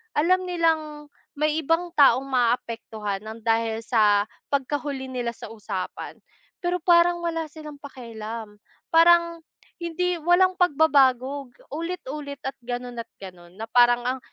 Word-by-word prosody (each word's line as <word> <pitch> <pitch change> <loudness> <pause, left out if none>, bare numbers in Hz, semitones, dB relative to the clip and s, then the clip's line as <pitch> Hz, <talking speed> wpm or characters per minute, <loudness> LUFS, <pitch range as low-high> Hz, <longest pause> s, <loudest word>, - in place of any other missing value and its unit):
alam 365 +5 +3
nilang 315 -4 -1 0.3
may 300 +1 +1
ibang 330 +4 +1
taong 275 -2 +5
maaapektuhan 230 -5 -1
ng 220 +1 -8
dahil 225 0 +1
sa 210 -3 +3 0.3
pagkahuli 280 -1 -2
nila 245 -2 -2
sa - - -9
usapan, 200 -4 -6 0.4
pero 355 +1 0
parang 345 0 +4
wala 330 -1 -2
silang 300 -1 -11
pakialam. 225 -5 -8 0.3
Parang 335 0 +5 0.4
hindi 355 +2 -1
walang 355 +3 +4
pagbabago, 280 -4 +3 0.2
ulit-ulit 300 -4 -5
at 270 - -2
ganun 245 0 -5
at - - -14
ganun 180 -2 -12
na 220 - -5
parang 240 0 +5
ang 255 +1 -1
275 Hz, 125 wpm, -24 LUFS, 230-330 Hz, 0.4 s, taong